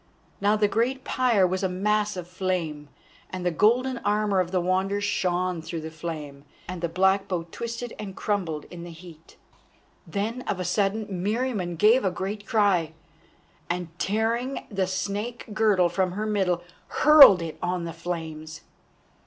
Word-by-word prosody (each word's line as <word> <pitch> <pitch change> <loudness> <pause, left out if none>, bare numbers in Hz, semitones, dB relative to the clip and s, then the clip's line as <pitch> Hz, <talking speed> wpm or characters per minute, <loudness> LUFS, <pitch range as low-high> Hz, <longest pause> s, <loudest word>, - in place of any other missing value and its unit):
Now 205 +1 +3
the 210 -1 +3
great 250 +5 0
pyre 240 -7 +2
was 185 +1 -1
a 190 - 0
mass 210 +2 0
of 175 -1 -6
flame, 175 -5 -3 0.4
and 185 -1 -5
the 180 - +2
golden 240 +8 +2
armour 210 -2 +1
of 180 -2 0
the 185 0 +1
Wanderer 190 +3 0
shone 185 -3 0
through 160 0 -5
the 160 +1 -7
flame, 155 -4 -7 0.2
and 180 -1 -6
the 170 - -1
black 190 +3 +2
bow 180 -4 -2
twisted 235 0 -5
and 195 -3 -6
crumbled 175 -8 -2
in 175 -1 -8
the 175 - -8
heat. 165 -1 -14 0.7
Then 220 +5 -3
of 190 - -1
a 180 - -2
sudden 200 +4 0
Meriamun 205 -1 -2
gave 220 +8 +5
a 190 - +2
great 195 +3 -5
cry, 190 -7 +2 0.8
and 175 -1 -2
tearing 230 +6 -1
the 195 -2 0
snake 205 +5 -3
girdle 210 -5 +3
from 185 +1 -1
her 210 +3 -3
middle 190 -5 0 0.2
hurled 280 - +8
it 160 -1 -7
on 180 0 -1
the 165 -1 -5
flames. 160 -2 -6
190 Hz, 160 wpm, -26 LUFS, 175-210 Hz, 0.8 s, hurled